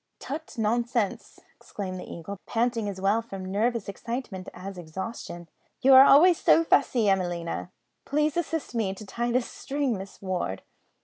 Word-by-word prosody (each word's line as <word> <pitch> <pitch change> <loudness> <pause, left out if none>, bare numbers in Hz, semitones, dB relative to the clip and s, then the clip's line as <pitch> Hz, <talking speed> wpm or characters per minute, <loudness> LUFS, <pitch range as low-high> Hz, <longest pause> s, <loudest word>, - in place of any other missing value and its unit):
"Tut, 310 +1 -7
nonsense!" 235 -1 -1
exclaimed 185 -3 -6
the - - -9
Eagle, 185 +4 -7
panting 230 -2 0
as 190 -2 -6
well 200 +4 +2
from 195 -5 -8
nervous 230 +2 0
excitement 200 -2 -5
as 190 +1 -8
exhaustion; 175 +1 -7 0.3
"you 270 +1 +6
are 265 +1 +10
always 330 +5 +7
so 330 - +5
fussy, 255 -8 +3
Emelina. 175 -3 -1 0.3
Please 300 +1 0
assist 325 -4 -2
me 210 -5 -1
to 215 - -10
tie 235 +4 -2
this 250 0 +1
string, 275 -3 -2
Miss 195 0 -9
Ward." 180 - -3
220 Hz, 150 wpm, -27 LUFS, 190-255 Hz, 0.3 s, are